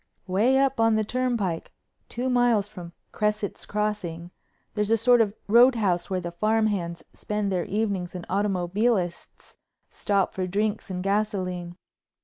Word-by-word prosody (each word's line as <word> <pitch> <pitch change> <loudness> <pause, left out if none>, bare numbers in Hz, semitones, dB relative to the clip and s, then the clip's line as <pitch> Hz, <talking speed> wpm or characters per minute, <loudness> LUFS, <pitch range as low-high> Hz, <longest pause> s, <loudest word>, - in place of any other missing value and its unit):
Way 215 +8 +2
up 270 -1 +2
on 225 -1 +4
the 215 - +2
turnpike, 225 -7 -2 0.4
two 245 +2 -3
miles 245 -5 +3
from 180 -5 -10 0.2
Cresset's 210 -1 -2
Crossing, 185 -5 -3 0.4
there's 210 -1 -1
a 225 - +4
sort 240 +2 +5
of 210 -2 0
roadhouse 220 -6 +4
where 185 -1 -1
the 175 -1 -5
farm 215 +5 +1
hands 170 -5 -2
spend 210 -1 -3
their 180 -2 0
evenings 195 -4 -2
and 180 - -6
automobilists 195 0 -1 0.3
stop 200 -2 0
for 185 -1 -2
drinks 210 +3 -1
and 180 -1 -4
gasoline. 185 -4 -2
205 Hz, 140 wpm, -25 LUFS, 180-220 Hz, 0.4 s, sort